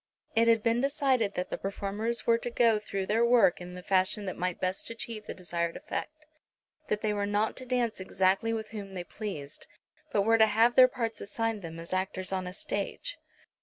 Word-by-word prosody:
It 230 +1 +4
had 225 -2 +4
been 230 +1 +2
decided 270 -7 +1
that 180 - -3
the - - -3
performers 205 +4 -2
were 230 0 +4
to 240 - -3
go 230 -2 +3
through 195 -2 -3
their 220 +4 +2
work 235 -7 +4
in 180 0 -8
the 180 - -8
fashion 190 +2 +1
that 185 - -3
might 180 0 -2
best 185 +1 -2
achieve 230 -2 -5
the - - -5
desired 170 -2 -2
effect; 305 0 -6 0.6
that 210 - -1
they 215 -1 +1
were 205 -1 -1
not 205 +2 +1
to 255 - -6
dance 245 -4 0
exactly 190 +3 +1
with 220 -1 -3
whom 200 -3 -7
they 180 - -3
pleased, 175 -8 -6 0.4
but 200 - +2
were 225 +2 +4
to 220 - +7
have 225 +3 +4
their 255 0 +8
parts 230 -3 -3
assigned 225 +1 -2
them 165 -2 -7
as 170 +2 -7
actors 185 0 -2
on 185 -1 -2
a 180 - -6
stage. 205 - -4
210 Hz, 205 wpm, -29 LUFS, 190-230 Hz, 0.6 s, their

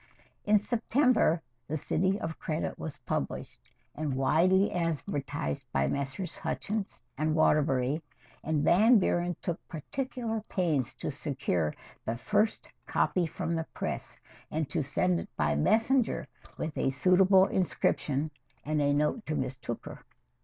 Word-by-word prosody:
III 210 - +3
In - - +9
September 230 - +2 0.2
"The 155 - -1
City 190 +6 +1
of 160 0 -5
Credit" 155 0 -3
was 155 - -5
published, - - -3 0.3
and 150 -3 -2
widely 180 +9 +3
advertised 145 - -2
by 65 - +2
Messrs. 140 - -3
Hutchins 210 -1 -3
& - - -20
Waterbury, 150 -2 +2 0.4
and 155 -1 0
Van 220 +7 +6
Buren 175 -2 +1
took 170 -1 -2
particular 225 - -3
pains 150 - 0
to - - -4
secure 135 - -1 0.3
the 115 +1 -2
first 210 - +1 0.2
copy 180 -3 +1
from 165 +1 -3
the 160 -1 -2
press - - -4 0.3
and 155 -1 -1
to - - 0
send 170 +5 +1
it - - -7
by 75 - +2
messenger 220 - +2 0.3
with 155 -1 -3
a - - +2
suitable 185 +6 +5
inscription 155 -5 0 0.3
and 150 0 +1
a 145 0 +3
note 150 - +1
to 155 - -1
Miss 130 -1 -1
Tooker. 120 -2 -7
160 Hz, 140 wpm, -30 LUFS, 145-190 Hz, 0.4 s, In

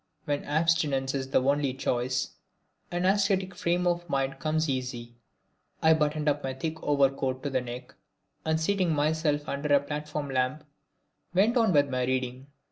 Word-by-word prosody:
When 145 -2 -1
abstinence 150 -4 +1
is 135 -1 -3
the 130 - +2
only 140 -1 +1
choice, 130 -1 -1 0.6
an 175 +1 -1
ascetic 195 -1 +2
frame 175 +1 0
of 175 -1 0
mind 135 -2 -1
comes 155 +1 0
easy. 125 -3 -3 0.7
I 160 0 +5
buttoned 150 -1 0
up 145 0 +1
my 130 -1 -3
thick 160 +4 -4
overcoat 135 -2 +1
to 145 - -2
the 130 -1 +1
neck 125 0 -8 0.5
and 160 0 +1
seating 180 0 +1
myself 150 0 +1
under 145 +1 -2
a - - +6
platform 150 0 -4
lamp 130 +3 0 0.7
went 210 +6 +4
on 230 -5 +4
with 145 -4 +3
my 125 -1 0
reading. 130 +1 -2
145 Hz, 160 wpm, -28 LUFS, 130-160 Hz, 0.7 s, a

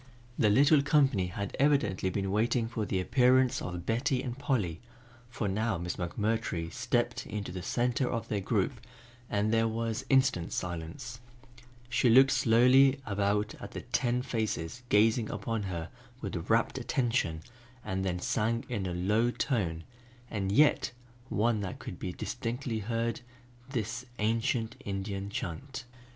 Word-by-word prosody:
The 110 - +3
little 140 +7 +6
company 135 - +3
had 100 +2 -5
evidently 120 -10 +2
been 95 +1 -2
waiting 115 +3 +1
for 110 -3 -3
the 95 - 0
appearance 130 +5 +3
of 90 -1 -5
Betty 125 +4 0
and 120 -2 -4
Polly, 115 - -1 0.5
for 115 -3 -3
now 110 +1 0
Miss 85 +1 -4
McMurtry 90 -2 -2
stepped 120 0 -1
into 105 -3 -4
the 90 0 -5
center 125 +6 0
of 115 -2 -3
their 105 - -1
group 110 +5 0 0.5
and 105 +2 +1
there 115 0 +3
was 115 0 -2
instant 130 -10 +3
silence. 90 - -5 0.7
She 120 +1 +2
looked 135 +4 +7
slowly 130 +3 +5
about 105 +1 0
at - - -9
the - - -5
ten 125 0 0
faces 110 -3 -2
gazing 110 +2 +3
upon 115 -2 -2
her 85 -3 -4 0.3
with - - -5
rapt - - +2
attention 115 -11 0 0.4
and 95 -2 -2
then 90 -2 -1
sang 115 +5 0
in 105 -6 -2
a 90 - -3
low 105 +7 +2
tone, 95 - -1 0.5
and 95 -3 -1
yet 145 +3 +4 0.4
one 110 +1 +1
that 95 -2 -4
could 90 - -8
be 90 - -3
distinctly 120 +3 -3
heard, 115 +2 -2 0.5
this 115 -1 -3
ancient 115 +1 0
Indian 100 0 -4
chant. 125 - -5
115 Hz, 145 wpm, -30 LUFS, 95-125 Hz, 0.7 s, looked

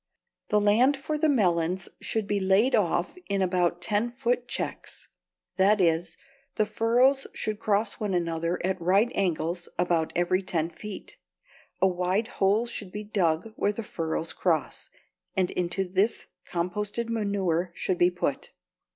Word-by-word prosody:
The 210 - +4
land 230 +7 +4
for 305 +3 -3
the 305 +1 +2
melons 180 - +1
should 220 -2 -1
be 205 0 0
laid 195 +7 +3
off 185 - +1
in 200 -1 +1
about 180 -1 +1
ten 210 +2 +1
foot 245 -1 -1
checks; - - -5 0.5
that 200 +2 +4
is, 170 -1 +1 0.4
the 215 - +2
furrows 250 +6 +2
should 215 -1 -3
cross 210 -1 0
one 205 -3 -1
another 170 0 -1
at 185 -1 -1
right 195 +7 +3
angles 175 -2 -1
about 170 -2 +1
every 175 +2 +2
ten 170 -3 -1
feet. 210 +4 -9 0.7
A - - +7
wide 185 +5 0
hole 205 +4 +3
should 210 -5 -6
be 210 +2 -5
dug 195 -1 0
where 205 - +1
the 225 +2 -5
furrows 165 -4 -3
cross, 165 -5 -1 0.5
and 185 -1 +2
into 180 +2 -1
this 190 +5 +1 0.3
composted 205 +6 -2
manure 200 -6 0
should 185 - -1
be 175 - +5
put. 175 -6 -3
195 Hz, 150 wpm, -27 LUFS, 175-215 Hz, 0.7 s, A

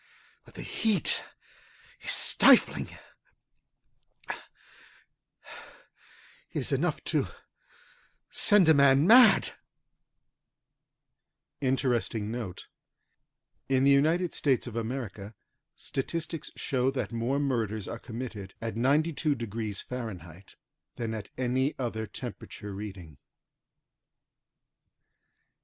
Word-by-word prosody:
But - - -19
the - - -7
heat 220 -3 +1 0.8
is - - -6
stifling. - - +5 1.4
It - - -8 2.1
is - - -2
enough - - -1
to - - 0 1.0
send 205 -5 +5
a 160 - +7
man 140 0 +5
mad. 225 0 +7 2.1
Interesting 120 -5 -1
note: 115 -7 -6 1.0
In 130 -1 +2
the 140 - +5
USA, 130 - 0 0.4
statistics 160 +3 -4
show 130 -1 0
that 125 -7 -3
more 120 +4 -1
murders 110 -7 -2
are 115 - -6
committed 110 -5 -7
at 115 0 -4
92║ 120 - -1
fahrenheit 95 -7 -8 0.4
than 115 -2 -4
at 110 -2 -6
any 130 +3 0
other 110 -3 -3
temperature 105 +1 -8
reading. 95 -8 -9
125 Hz, 80 wpm, -28 LUFS, 110-140 Hz, 2.1 s, a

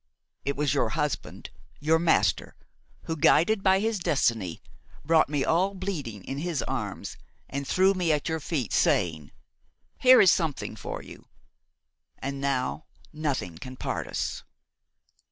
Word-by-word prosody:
It 140 - -1
was 145 -2 0
your 115 - +1
husband–your 150 +2 -2
master–who, 165 -1 -1
guided 185 +8 +4
by 190 -1 +4
his 220 0 -1
destiny, 115 - 0 0.5
brought 160 -1 +4
me 145 -2 0
all 190 +4 +1
bleeding 150 - -5
in 135 - -5
his 165 -3 -2
arms 110 -7 -4 0.3
and 140 0 -4
threw 190 +1 +4
me 180 -4 0
at 150 -2 0
your 160 -1 -1
feet, 145 -6 -3
saying: 80 -4 +1 0.7
'Here 255 0 +8
is 185 - +7
something 160 -5 -1
for - - -6
you!' - - -13 0.9
And 140 0 -5
now 140 +2 -1 0.3
nothing 135 - -3
can 130 0 -9
part - - -3
us." - - -3
150 Hz, 135 wpm, -27 LUFS, 130-175 Hz, 0.9 s, Here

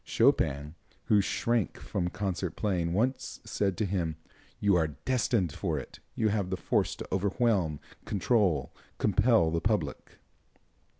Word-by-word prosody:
Chopin, 70 +3 +2 0.3
who 105 -1 +4
shrank 115 +1 0
from 90 -1 -2
concert 95 -3 -3
playing, 90 -5 0
once 120 +9 -1
said 95 -3 -1
to 110 - +1
him: 85 -5 -1 0.4
"You 100 -2 +3
are 80 -2 +3 0.2
destined 115 - +1
for - - -2
it. - - -8 0.2
You 110 -1 +2
have 100 -3 0
the 95 - -1
force - - 0
to - - -7
overwhelm, 95 - +1 0.2
control, 100 - +1 0.2
compel 105 -4 +3
the 85 0 0
public." 100 -8 -2
95 Hz, 135 wpm, -29 LUFS, 85-110 Hz, 0.4 s, who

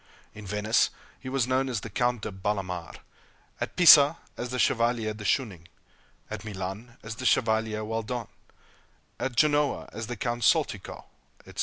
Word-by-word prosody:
In 105 -1 -10
Venice, 105 +3 +2 0.3
he 130 - -7
was 130 -3 +1
known 130 +1 0
as 115 -5 -2
the 115 - -7
Count 120 +1 0
de - - -3
Bellamare; 95 -3 -4 0.6
at - - -4
Pisa, 160 -4 +8 0.2
as 125 - -5
the 125 - -3
Chevalier 115 -3 +1
de 105 0 -9
Schoening; 100 -9 -1 0.6
at 110 -1 -6
Milan, 105 +3 -6
as 115 0 -7
the 130 - -6
Chevalier 110 -2 +1
Welldone; 115 +1 -3 0.9
at 130 -2 -3
Genoa, 145 +2 +2
as 110 +1 -5
the 120 - -4
Count 120 +2 -2
Soltikow, - - 0 0.4
etc. - - -12
115 Hz, 155 wpm, -27 LUFS, 105-125 Hz, 0.9 s, Pisa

